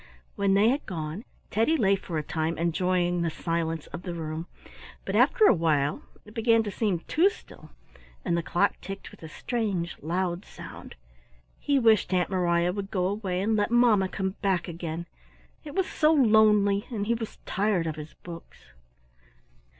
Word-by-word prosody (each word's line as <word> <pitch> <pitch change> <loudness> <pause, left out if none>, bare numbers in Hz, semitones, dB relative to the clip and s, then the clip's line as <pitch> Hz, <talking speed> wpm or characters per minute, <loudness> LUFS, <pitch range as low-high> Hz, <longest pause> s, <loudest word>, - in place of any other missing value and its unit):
When 200 -1 +2
they 210 +3 +5
had 275 +4 0
gone 165 +4 -5 0.3
Teddy 230 +10 +2
lay 200 -6 +3
for 180 -4 -5
a 155 - -1
time 160 +1 -2
enjoying 175 +1 +1
the 170 - +1
silence 165 -1 -2
of 170 - -5
the 175 -1 -5
room, 160 +1 -5 0.6
but - - -2
after 450 -3 +5
a - - +7
while 150 -5 +1 0.2
it 210 - -14
began 225 0 +3
to 205 - -4
seem 195 -5 -1
too 340 - +3
still 405 - -14 0.6
and 170 - +1
the 170 - +1
clock 175 +4 0
ticked 195 0 -8
with - - -16
a 160 - -8
strange 195 -4 -2
loud 175 +3 -2
sound. - - -11 0.6
He 285 -1 +1
wished 220 -7 +4
Aunt 180 +1 +1
Mariah 175 -1 +2
would 200 0 -5
go 180 -2 0
away 190 -2 -2
and 220 +2 +1
let 205 -1 +1
mamma 230 -5 +4
come 190 -1 -2
back 190 -4 0
again. 170 -1 -5 0.6
It 295 0 -9
was 380 -1 +2
so 305 0 +2
lonely, 215 -7 +4
and 215 -5 -3
he 230 - +1
was 225 -2 -5
tired 195 -3 0
of 160 -2 -3
his 155 0 -9
books. 165 - -11
190 Hz, 175 wpm, -27 LUFS, 170-215 Hz, 0.6 s, a